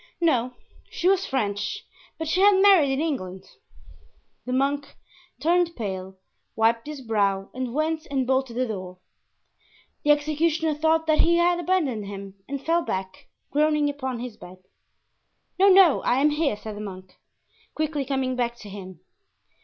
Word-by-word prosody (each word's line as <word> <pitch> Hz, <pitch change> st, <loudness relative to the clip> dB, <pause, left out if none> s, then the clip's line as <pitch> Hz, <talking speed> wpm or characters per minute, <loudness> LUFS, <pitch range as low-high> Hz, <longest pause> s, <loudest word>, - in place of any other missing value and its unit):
"No, 255 Hz, -7 st, +1 dB, 0.3 s
she 350 Hz, -, -2 dB
was 385 Hz, 0 st, +3 dB
French, 240 Hz, -, -2 dB, 0.3 s
but 320 Hz, -, -4 dB
she 365 Hz, +4 st, +1 dB
had 410 Hz, +1 st, +7 dB
married 380 Hz, -8 st, +6 dB
in 270 Hz, -, 0 dB
England." 190 Hz, -, -3 dB, 1.0 s
The -, -, -2 dB
monk 280 Hz, +2 st, -1 dB, 0.4 s
turned 340 Hz, +3 st, +2 dB
pale, 190 Hz, -4 st, -5 dB, 0.4 s
wiped 230 Hz, +3 st, +2 dB
his 300 Hz, -2 st, -7 dB
brow 200 Hz, -4 st, 0 dB
and 255 Hz, -1 st, -4 dB
went 310 Hz, +3 st, -1 dB
and 270 Hz, -2 st, 0 dB
bolted 260 Hz, -2 st, 0 dB
the 255 Hz, +1 st, 0 dB
door. 185 Hz, -5 st, -6 dB, 1.1 s
The 295 Hz, -, 0 dB
executioner 310 Hz, +2 st, +2 dB
thought 320 Hz, +2 st, +1 dB
that 310 Hz, -1 st, +2 dB
he 340 Hz, -, +4 dB
had 345 Hz, 0 st, +3 dB
abandoned 305 Hz, -, 0 dB
him 195 Hz, -1 st, -8 dB
and 280 Hz, 0 st, -5 dB
fell 335 Hz, +1 st, +2 dB
back, 190 Hz, -5 st, -5 dB, 0.2 s
groaning, 300 Hz, 0 st, +2 dB
upon 260 Hz, -3 st, -4 dB
his 245 Hz, -3 st, -7 dB
bed. 185 Hz, -1 st, -13 dB, 1.0 s
"No, 390 Hz, -, +6 dB
no; 370 Hz, -6 st, +6 dB
I -, -, +1 dB
am 290 Hz, +3 st, +3 dB
here," 295 Hz, -7 st, 0 dB
said 215 Hz, 0 st, -8 dB
the 205 Hz, -, -7 dB
monk, 185 Hz, -2 st, -9 dB, 0.6 s
quickly 305 Hz, -2 st, -1 dB
coming 265 Hz, -1 st, -1 dB
back 240 Hz, -1 st, -1 dB
to 210 Hz, -, -10 dB
him. 190 Hz, -3 st, -10 dB
270 Hz, 155 wpm, -25 LUFS, 215-315 Hz, 1.1 s, had